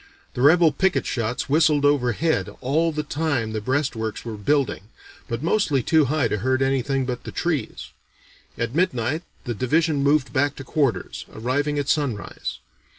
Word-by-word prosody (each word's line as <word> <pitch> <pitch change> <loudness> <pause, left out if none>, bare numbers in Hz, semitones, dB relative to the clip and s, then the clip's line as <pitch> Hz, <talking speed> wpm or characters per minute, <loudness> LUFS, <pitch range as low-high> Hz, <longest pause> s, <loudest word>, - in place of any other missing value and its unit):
The 125 - -3
rebel 160 +3 +6
picket 190 +3 +1
shots 115 0 -2
whistled 150 0 +3
overhead 135 - +1
all 155 +6 +1
the 150 0 -3
time 145 -7 -1
the 110 - -2
breastworks 125 -3 -2
were 115 -2 -5
building, 105 -1 0 0.4
but 115 +3 -3
mostly 160 - +1
too 155 +2 +4
high 140 -2 +1
to 105 - -2
hurt 130 +4 +1
anything 135 0 0
but 125 -1 -4
the - - -7
trees. 165 -6 -3 0.7
At 115 +1 -2
midnight 155 -4 0 0.2
the 120 - -3
division 145 +6 +1
moved 140 -1 +2
back 145 +1 +1
to 135 - -8
quarters, 130 - -1
arriving 145 +6 -1
at 145 -1 -1
sunrise. 140 -9 -2
140 Hz, 155 wpm, -23 LUFS, 120-155 Hz, 0.7 s, rebel